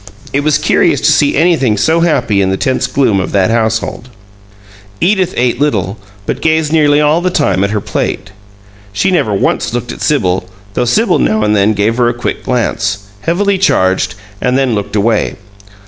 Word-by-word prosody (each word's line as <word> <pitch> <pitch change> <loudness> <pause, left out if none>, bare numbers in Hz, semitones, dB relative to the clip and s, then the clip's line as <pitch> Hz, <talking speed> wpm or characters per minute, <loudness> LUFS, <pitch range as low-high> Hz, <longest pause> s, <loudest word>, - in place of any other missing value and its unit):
It 140 - +2
was 150 0 +2
curious - - +2
to - - +3
see 145 - +2
anything 145 -9 +2
so 160 +10 +2
happy 130 -12 +1
in 95 - +1
the 95 - -1
tense 130 +5 0
gloom 125 -8 +1
of 95 - -3
that 100 +1 +2
household. 110 +2 -1 0.9
Edith 190 -1 +1
ate 125 +1 0
little, 105 -8 -1 0.3
but - - -3
gazed 160 -1 +1
nearly 150 -2 +3
all 150 +3 +2
the 185 - 0
time 100 - +1
at 100 - 0
her 105 0 -1
plate. 95 -1 -3 0.6
She 110 - 0
never 150 - +1
once 100 - -1
looked - - -3
at - - -9
Sibyl, 90 0 0 0.2
though 125 - 0
Sibyl 215 - +2
now 110 0 +1
and 105 0 +2
then 105 +1 +2
gave 105 +3 0
her 120 -1 +3
a 120 - -3
quick 120 - -4
glance, 105 -5 -2
heavily 195 - 0
charged, 95 - +1 0.3
and 125 +1 +1
then 135 -3 +1
looked 105 -1 -3
away. 110 +1 +1
120 Hz, 185 wpm, -13 LUFS, 100-150 Hz, 0.9 s, to